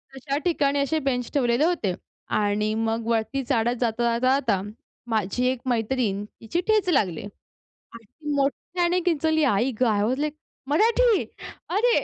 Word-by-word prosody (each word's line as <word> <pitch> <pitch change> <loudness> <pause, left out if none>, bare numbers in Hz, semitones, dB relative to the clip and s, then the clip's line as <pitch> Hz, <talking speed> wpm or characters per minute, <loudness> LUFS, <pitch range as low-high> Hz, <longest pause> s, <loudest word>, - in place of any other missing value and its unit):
तशा 275 +1 -3
ठिकाणी 285 -5 +2
असे 280 +3 +1
बेंच 245 -2 -2
ठेवलेले 250 0 +2
होते. 320 - 0 0.5
आणि 210 +1 0
मग 225 0 -1
वरती 230 +4 0
चढत 240 -1 +1
जाता-जाता, 235 0 +1 0.2
जाता 215 -8 0 0.5
माझी 220 +2 0
एक 255 -1 0
मैत्रीण, 225 -3 0 0.2
तिची 325 +10 -2
ठेच 430 -4 +3
लागली. 200 - +1 0.7
आणि 230 -1 -12
ती 300 +7 -6
मोट्ठ्याने 345 +6 0
किंचाळली. 315 -2 +2
आई 250 -1 +2
गं! 250 - +5
आय 205 -1 +1
वास 255 +5 0
लाइक, 300 0 -1 0.3
मराठी! 450 +7 +3 0.5
अरे! 455 +6 +3
255 Hz, 145 wpm, -25 LUFS, 225-315 Hz, 0.7 s, गं